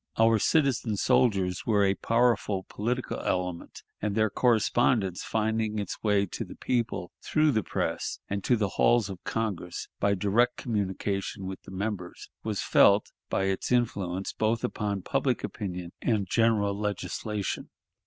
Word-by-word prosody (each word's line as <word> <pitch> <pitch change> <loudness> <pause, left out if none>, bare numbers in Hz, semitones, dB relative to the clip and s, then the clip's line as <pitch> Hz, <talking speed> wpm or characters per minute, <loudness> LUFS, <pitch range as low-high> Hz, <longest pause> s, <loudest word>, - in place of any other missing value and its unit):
Our 115 0 +5
citizen 130 -6 +2
soldiers 100 -8 +2
were 105 -3 +4
a 95 - +3
powerful 115 -4 +1
political 120 +4 -2
element, 90 -2 -3 0.2
and 105 -1 -1
their 110 -2 +2
correspondence, 115 -4 +2
finding 110 0 0
its 100 -3 -4
way 105 -2 +3
to 90 - -5
the - - -10
people 115 -8 -2
through 155 -1 +2
the 110 -4 +1
press - - -2
and 100 -1 -3
to 125 - +4
the 105 -2 +1
halls 120 -4 +4
of 95 - -9
Congress 100 -6 -3
by 100 0 +2
direct 110 +6 +2
communication 100 -3 -2
with 95 0 -6
the - - -12
members, 95 -2 -5
was - - -2
felt, - - +5 0.2
by - - 0
its 95 +3 -1
influence 100 -6 0
both 110 +1 0
upon 100 -3 -2
public 135 +1 0
opinion 90 -5 -5
and 105 -5 +1
general 105 -1 +2
legislation. 105 0 -3
105 Hz, 145 wpm, -28 LUFS, 95-115 Hz, 0.2 s, Our